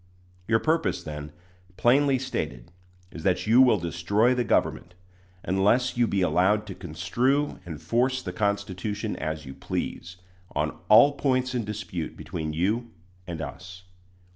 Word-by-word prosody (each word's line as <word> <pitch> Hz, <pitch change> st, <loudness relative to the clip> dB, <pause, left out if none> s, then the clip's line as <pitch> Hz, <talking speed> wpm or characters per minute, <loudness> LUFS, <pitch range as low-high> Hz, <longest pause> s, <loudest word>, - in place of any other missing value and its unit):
Your 115 Hz, -, +4 dB
purpose, 160 Hz, +6 st, 0 dB
then, 75 Hz, -1 st, -7 dB, 0.5 s
plainly 135 Hz, +2 st, +4 dB
stated, 75 Hz, -, -4 dB, 0.4 s
is 85 Hz, -, -8 dB
that 90 Hz, +1 st, +1 dB
you 115 Hz, +4 st, +6 dB
will 125 Hz, -5 st, +6 dB
destroy 90 Hz, +8 st, +1 dB
the 125 Hz, -1 st, 0 dB
government, 90 Hz, -5 st, 0 dB, 0.5 s
unless 105 Hz, +7 st, +2 dB
you 120 Hz, -1 st, +3 dB
be 100 Hz, -2 st, 0 dB
allowed 100 Hz, +4 st, +2 dB
to 100 Hz, -, -7 dB
construe 110 Hz, -, -1 dB
and 80 Hz, -4 st, -6 dB
force 130 Hz, +2 st, +1 dB
the 90 Hz, -, -5 dB
Constitution 100 Hz, +1 st, -2 dB
as 80 Hz, -1 st, -4 dB
you 65 Hz, -, -8 dB
please, 90 Hz, +5 st, -5 dB, 0.4 s
on -, -, -1 dB
all 120 Hz, +7 st, +8 dB
points 130 Hz, -3 st, 0 dB
in 120 Hz, -3 st, -1 dB
dispute 100 Hz, -6 st, -5 dB
between 80 Hz, -2 st, -4 dB
you 105 Hz, +9 st, -1 dB, 0.4 s
and 85 Hz, -2 st, -4 dB
us. 90 Hz, +5 st, -9 dB
100 Hz, 140 wpm, -26 LUFS, 85-120 Hz, 0.5 s, all